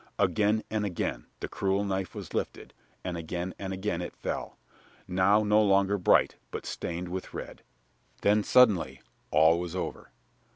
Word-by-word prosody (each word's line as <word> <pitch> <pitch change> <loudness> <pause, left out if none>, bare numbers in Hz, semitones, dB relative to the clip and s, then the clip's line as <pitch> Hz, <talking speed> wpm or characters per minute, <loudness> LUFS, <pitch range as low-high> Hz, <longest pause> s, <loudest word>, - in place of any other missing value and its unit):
Again 110 +1 +2
and 110 -1 0
again 85 -10 -3
the - - -2
cruel 100 +1 0
knife 95 -2 -2
was - - -7
lifted, - - -4 0.3
and 90 -2 -3
again 85 +2 -4
and 95 -1 -4
again 95 -2 -2
it 85 - -6
fell, - - -4 0.5
now 100 +4 +3
no 105 +1 +4
longer 100 0 +3
bright, 90 - +4
but - - -6
stained 85 +1 -4
with 95 +1 -6
red. - - -7 0.6
Then, 105 +1 +3
suddenly, 110 -9 +4 0.3
all 80 +3 +5
was 90 0 -5
over. 90 - -4
95 Hz, 155 wpm, -29 LUFS, 90-105 Hz, 0.6 s, all